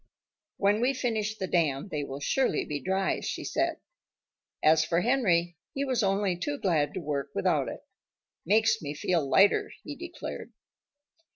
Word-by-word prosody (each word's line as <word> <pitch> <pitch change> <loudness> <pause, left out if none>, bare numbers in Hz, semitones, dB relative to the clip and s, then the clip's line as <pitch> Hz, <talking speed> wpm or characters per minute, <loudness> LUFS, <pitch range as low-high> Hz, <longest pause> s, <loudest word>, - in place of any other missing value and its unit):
"When 205 +2 +2
we 265 +3 +2
finish 220 -4 -1
the 190 - -2
dam 160 -2 0
they 150 -4 -2
will 140 0 -6
surely 260 - +1
be 145 -1 -3
dry," 190 +2 0
she - - -4
said. - - 0 0.9
As 155 0 +5
for 170 +2 +1
Henry, 175 -9 +2 0.2
he 275 +1 0
was 255 -3 0
only 195 -2 +1
too 290 +12 -3
glad 160 - 0
to - - -2
work 145 -4 -3
without 100 - +1
it. - - -8 0.6
"Makes 220 +4 +3
me 145 -1 -5
feel 170 +2 +1
lighter," 200 - +4
he - - -6
declared. - - -7
190 Hz, 160 wpm, -28 LUFS, 155-220 Hz, 0.9 s, As